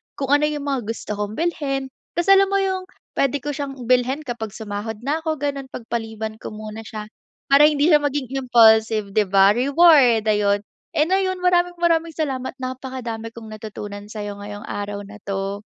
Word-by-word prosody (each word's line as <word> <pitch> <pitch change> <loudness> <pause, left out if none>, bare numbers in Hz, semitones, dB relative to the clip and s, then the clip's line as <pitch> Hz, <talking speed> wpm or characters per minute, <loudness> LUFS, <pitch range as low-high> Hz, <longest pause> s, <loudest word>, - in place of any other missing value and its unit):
kung 275 0 -3
ano 290 +1 +4
yung 295 -1 -3
mga 270 -6 -2
gusto 210 -2 -4
kong 210 +1 -3
bilhin 275 -6 -2 0.2
kasi 345 +3 +2
alam 390 0 +6
mo 395 0 +1
yung 375 -1 -2 0.2
puwede 275 -1 0
ko 295 - -2
siyang 280 -1 -5
bilhin 255 +4 +1
kapag 225 -5 -5
sumahod 215 +1 -5
na 295 +4 0
ko 320 -1 -2
gano'n, 280 -2 -3
'pagpaliban 220 -3 -5
ko 215 - -8
muna 215 0 -7
siya 215 0 -7 0.4
para 295 +2 +8
hindi 300 +2 +2
siya 300 - +7
maging 285 -3 -2
impulsive 220 -4 +4
di 210 0 +2
ba, 195 +1 +6
reward 270 -2 +5
ayun. 205 0 +1 0.3
And 310 +4 +2
ayun, 375 -1 0
maraming-maraming 345 -2 +2
salamat 265 -5 -3
napakadami 255 -3 -6
kong 220 -2 -10
natutunan 205 -1 -8
sa'yo 205 -1 -6
ngayong 205 +1 -8
araw 205 -1 -5
na 210 +1 -12
'to. 195 0 -3
255 Hz, 170 wpm, -22 LUFS, 215-295 Hz, 0.4 s, para